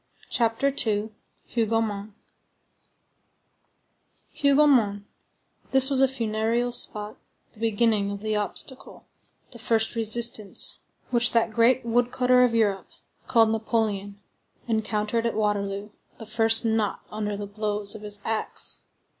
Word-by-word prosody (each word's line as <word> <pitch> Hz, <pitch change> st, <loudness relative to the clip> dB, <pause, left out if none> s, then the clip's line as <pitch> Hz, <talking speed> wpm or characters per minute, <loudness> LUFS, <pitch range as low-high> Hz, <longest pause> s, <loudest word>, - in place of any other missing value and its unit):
CHAPTER 235 Hz, +3 st, 0 dB
II—HOUGOMONT 215 Hz, 0 st, -3 dB, 2.3 s
Hougomont,—this 265 Hz, -1 st, +2 dB
was 270 Hz, -1 st, +2 dB
a 270 Hz, -, +5 dB
funereal 230 Hz, -1 st, -2 dB
spot, 210 Hz, -3 st, +1 dB, 0.4 s
the -, -, -20 dB
beginning 220 Hz, -2 st, +1 dB
of 200 Hz, 0 st, -6 dB
the 215 Hz, 0 st, -2 dB
obstacle, 210 Hz, +5 st, -6 dB, 0.5 s
the 235 Hz, -, -12 dB
first 225 Hz, -1 st, 0 dB
resistance, 225 Hz, -2 st, +3 dB, 0.3 s
which 240 Hz, -1 st, +2 dB
that 230 Hz, -1 st, +1 dB
great 235 Hz, +2 st, +2 dB
wood 240 Hz, +1 st, 0 dB
cutter 250 Hz, 0 st, +3 dB
of 240 Hz, -2 st, +1 dB
Europe, 205 Hz, -4 st, 0 dB, 0.4 s
called 225 Hz, -2 st, +3 dB
Napoleon, 215 Hz, -3 st, -2 dB, 0.5 s
encountered 220 Hz, 0 st, -1 dB
at 230 Hz, -, -3 dB
Waterloo, 205 Hz, -1 st, -2 dB, 0.3 s
the 225 Hz, -, -10 dB
first 225 Hz, +1 st, +2 dB
knot 220 Hz, -2 st, -1 dB
under 210 Hz, -1 st, -4 dB
the 205 Hz, -, -6 dB
blows 205 Hz, 0 st, -3 dB
of 215 Hz, -, -9 dB
his 210 Hz, -1 st, -6 dB
axe. 220 Hz, -1 st, -1 dB
225 Hz, 115 wpm, -24 LUFS, 210-235 Hz, 2.3 s, a